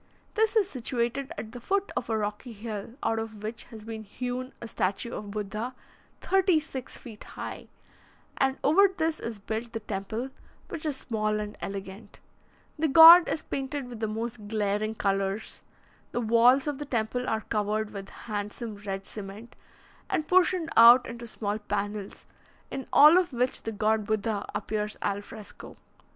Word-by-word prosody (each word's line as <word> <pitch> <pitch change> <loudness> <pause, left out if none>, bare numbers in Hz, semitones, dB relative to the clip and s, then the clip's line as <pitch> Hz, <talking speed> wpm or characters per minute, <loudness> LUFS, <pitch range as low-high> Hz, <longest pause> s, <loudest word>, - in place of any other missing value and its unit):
This 440 +1 +2
is 420 -4 +4
situated 255 -2 -2
at 220 - -6
the 245 0 -9
foot 395 +9 0
of 235 - -3
a 220 - +1
rocky 210 +3 -4
hill, 215 +1 -6
out 225 - +1
of 220 -2 -7
which 220 +2 -5
has 220 -3 -12
been 220 -1 -6
hewn 250 +4 -4
a 235 - -7
statue 205 +2 -2
of 210 - -6
Buddha, 215 +4 -4 0.5
thirty 380 -4 +3
six 270 -5 -7
feet 220 -3 -11
high, - - -7 0.7
and 265 0 +2
over 390 +8 +6
this 320 -1 0
is 230 -2 -5
built 220 +3 -5
the 225 - -2
temple, 220 +5 -4 0.4
which 320 -2 -4
is 285 -3 -1
small 215 -4 -1
and 210 0 -5
elegant. 195 +1 -7 0.6
The 320 - +3
god 330 +4 +10
is 315 - -2
painted 270 -1 -4
with 235 -3 -8
the 220 - -1
most 220 0 -5
glaring 210 0 -1
colours. 195 0 -1 0.5
The 240 - 0
walls 235 +4 +5
of 290 -2 -3
the 295 - -4
temple 245 -1 -1
are 220 0 0
covered 215 0 -1
with 195 -1 -7 0.2
handsome 210 +1 -4
red 195 -1 -5
cement, 210 +3 -9 0.5
and 310 - -1
portioned 365 -2 +3
out 235 +2 +9
into 235 0 -7
small 210 -1 -3
panels, 205 -1 -4 0.5
in 270 - -5
all 305 +5 +8
of 350 -6 -2
which 250 +1 0
the 225 - -4
god 215 0 +1
Buddha 215 -1 -1
appears 210 -1 -2
al 200 0 -1
fresco. 210 0 -11
225 Hz, 165 wpm, -28 LUFS, 210-260 Hz, 0.7 s, god